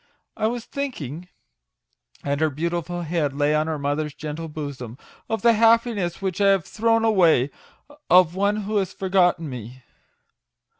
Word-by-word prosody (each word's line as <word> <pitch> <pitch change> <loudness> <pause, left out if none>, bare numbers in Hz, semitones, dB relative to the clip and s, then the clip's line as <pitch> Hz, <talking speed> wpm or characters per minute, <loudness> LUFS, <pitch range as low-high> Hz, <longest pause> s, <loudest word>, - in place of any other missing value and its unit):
I 215 - 0
was 235 0 -4
thinking" 180 - -5 1.0
and 140 +1 -1
her 155 - +3
beautiful 170 +3 -3
head 155 -4 -1
lay 145 +1 +2
on 155 +1 +1
her 160 -1 -2
mother's 145 +1 -2
gentle 155 +1 -6
bosom 140 -6 -7 0.2
" - - -29
of 225 +1 -2
the 235 -1 +6
happiness 225 -5 +2
which 190 0 -2
I 200 - +5
have 195 -4 +3
thrown 225 +1 +1
away 170 - +4 0.6
of 180 -2 +6
one 200 +2 0
who 210 +2 -1
has 190 -2 -1
forgotten 180 -3 +1
me." 125 0 -9
175 Hz, 155 wpm, -23 LUFS, 150-205 Hz, 1.0 s, the